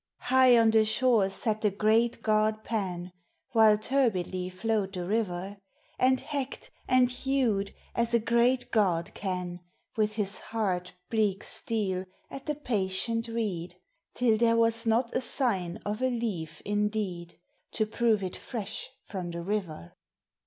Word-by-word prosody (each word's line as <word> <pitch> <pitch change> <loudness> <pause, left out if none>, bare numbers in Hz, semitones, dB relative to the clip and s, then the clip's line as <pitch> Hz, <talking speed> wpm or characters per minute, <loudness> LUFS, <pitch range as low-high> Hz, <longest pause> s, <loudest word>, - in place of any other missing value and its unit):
High 255 -1 +5
on 225 -1 +5
the 220 0 +5
shore 220 -2 +2
sat 215 +2 -2
the 210 - +3
great 220 +4 +1
god 215 0 +1
Pan, 185 -5 -3 0.4
While 220 -2 +6
turbidly 195 -7 0
flowed 195 +1 -1
the 180 -2 -4
river, 200 -1 -2 0.4
And 260 0 +4
hacked 280 -2 -5 0.2
and 255 -1 +4
hewed 250 -6 0 0.2
as 235 0 +1
a - - +4
great 235 +3 +2
god 180 -6 +1
can 180 -2 -4 0.4
With 215 -1 0
his 205 -2 0
hard, 185 -6 -2 0.2
bleak 210 -3 +1
steel 190 -5 +1 0.3
at 275 - -8
the 300 - 0
patient 230 -2 -1
reed, 200 -7 -3 0.4
Till 235 -3 +3
there 230 0 +4
was 230 0 +2
not 230 +2 +1
a - - +2
sign 200 -9 +1
of 210 +3 -3
a 260 - +2
leaf 190 -10 -4
indeed 205 -4 -2 0.4
To 215 - +1
prove 220 -1 +1
it 185 - -4
fresh 220 0 -6 0.2
from 185 -4 -5
the 170 0 -5
river. 175 - -4
215 Hz, 145 wpm, -28 LUFS, 190-235 Hz, 0.4 s, While